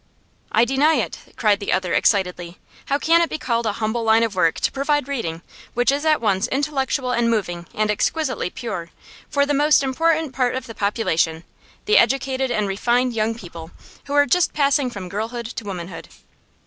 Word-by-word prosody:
'I 230 - +4
deny 280 +5 +3
it!' - - -2 0.2
cried 210 -2 +2
the 200 - -3
other, 185 -2 0
excitedly. 180 -3 +1 0.3
'How 280 - +1
can 330 +3 +3
it 335 - +1
be - - -3
called 235 -5 -1
a 210 - 0
humble 220 +2 -2
line 225 +1 +4
of 225 -3 -1
work 165 -3 +2
to - - +1
provide 280 0 0
reading, 175 -12 -4 0.3
which 245 +2 +3
is 285 +2 -2
at 310 -1 +3
once 205 -1 +1
intellectual 270 -2 -1
and 235 -1 +1
moving 175 -6 -2
and 215 0 +1
exquisitely 265 - -1
pure, 185 -6 -6 0.4
for 280 0 +2
the 290 - 0
most 295 +1 +4
important 315 +2 +1
part 255 -1 0
of 260 - -4
the 230 - -9
population 175 -7 0 0.4
the 425 - +5
educated 265 -1 +1
and 215 -4 0
refined 240 +5 +1
young 225 0 0
people 170 -6 -10 0.4
who 280 - -5
are 285 0 +5
just 360 +4 +2
passing 280 -2 +2
from 200 -6 -7
girlhood 225 +5 -4
to 225 -1 -6
womanhood? 180 -3 -7
235 Hz, 185 wpm, -21 LUFS, 200-275 Hz, 0.4 s, the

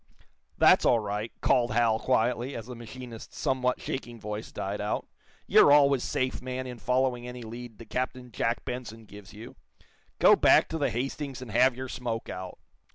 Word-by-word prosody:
"That's - - +6
all 120 - +4
right," 105 +1 -3
called 120 -3 +2
Hal, 115 -1 +3
quietly, 125 +1 0
as 115 - -6
the 125 0 -8
machinist's 120 0 -10
somewhat 125 -1 0
shaking 120 -3 -5
voice 105 +1 -6
died 100 +2 -4
out. 105 - -2 0.4
"You're - - +6
always 140 -3 +5
safe, 130 0 -2
man, 130 0 -4
in 125 -2 -7
following 125 -1 0
any 125 0 -7
lead 115 0 -9
that 115 -2 -13
Captain 125 -1 -3
Jack 115 +2 -1
Benson 120 -3 -6
gives 100 -1 -13
you. 110 +3 -11 0.6
Go - - +7
back - - +4
on 160 - -2
the 145 - +1
'Hastings' 135 +2 -4
and 120 - -9
have 125 +3 +4
your 130 +1 -5
smoke 120 -2 -4
out." 90 0 -7
120 Hz, 175 wpm, -28 LUFS, 110-130 Hz, 0.6 s, Go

